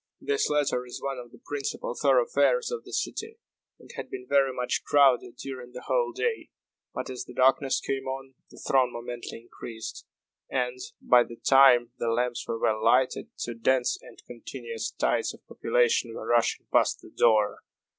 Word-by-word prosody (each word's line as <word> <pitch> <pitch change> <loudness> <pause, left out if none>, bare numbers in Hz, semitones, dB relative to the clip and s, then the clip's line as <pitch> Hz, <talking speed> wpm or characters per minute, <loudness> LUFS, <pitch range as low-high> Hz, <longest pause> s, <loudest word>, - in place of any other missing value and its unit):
This 425 0 0
latter 145 -4 +1
is 125 - -8
one 135 -2 -4
of 120 -1 -10
the - - -15
principal 145 - -3
thoroughfares 485 -1 +2
of 470 -2 -4
the - - -11
city, 445 +1 -3 0.4
and - - -14
had - - -6
been 385 -1 -7
very 135 -1 +3
much 125 -1 -2
crowded 130 -4 +4
during 130 -2 -8
the 125 - -8
whole 485 -1 +1
day. 465 -1 -2 0.4
But, - - -5
as 125 - -6
the 125 - -12
darkness 135 +1 +3
came 135 -1 -3
on, 135 0 -5 0.2
the - - -16
throng 130 -2 +2
momently 120 -1 -7
increased; 115 -1 -9 0.4
and, 125 -1 -1 0.2
by 125 -1 +6
the 115 - -10
time 125 -3 +6
the 115 - 0
lamps 120 +1 -1
were 115 - -2
well 110 -1 +1
lighted, 125 +2 +2
two 120 - -4
dense 125 +2 +1
and - - -15
continuous 120 -1 -6
tides - - 0
of - - -23
population 120 0 +1
were - - -6
rushing 120 -1 +1
past - - +3
the - - -15
door. 110 -3 +3
125 Hz, 175 wpm, -27 LUFS, 120-135 Hz, 0.4 s, by